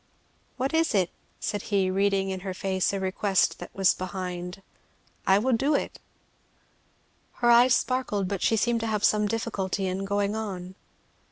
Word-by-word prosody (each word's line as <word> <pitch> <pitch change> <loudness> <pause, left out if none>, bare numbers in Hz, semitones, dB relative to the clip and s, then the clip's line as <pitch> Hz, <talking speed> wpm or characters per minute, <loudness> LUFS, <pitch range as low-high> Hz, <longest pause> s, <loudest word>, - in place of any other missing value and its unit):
"What 265 +3 -1
is 320 -7 +2
it?" 185 -3 +2 0.3
said 205 - -2
he, 195 -3 +2
reading 195 0 +1
in 190 - -3
her 190 0 -5
face 190 -1 0
that 200 - -1
a - - -3
request 190 +1 +1
was 190 -1 +3
behind. 180 0 -5 0.6
"I 190 - +6
will 250 +5 +1
do 275 +6 +2
it." - - -3 1.3
Her 240 -1 +2
eyes 245 +1 +6
sparkled, 240 -6 -1
but 195 -1 -3
she 225 - +2
seemed 235 +2 +1
to 225 - -3
have 210 -2 -1
some 210 0 +3
difficulty 200 -3 -2
in 190 +1 -2
going 200 +1 0
on. 190 -4 -5
200 Hz, 165 wpm, -27 LUFS, 190-225 Hz, 1.3 s, I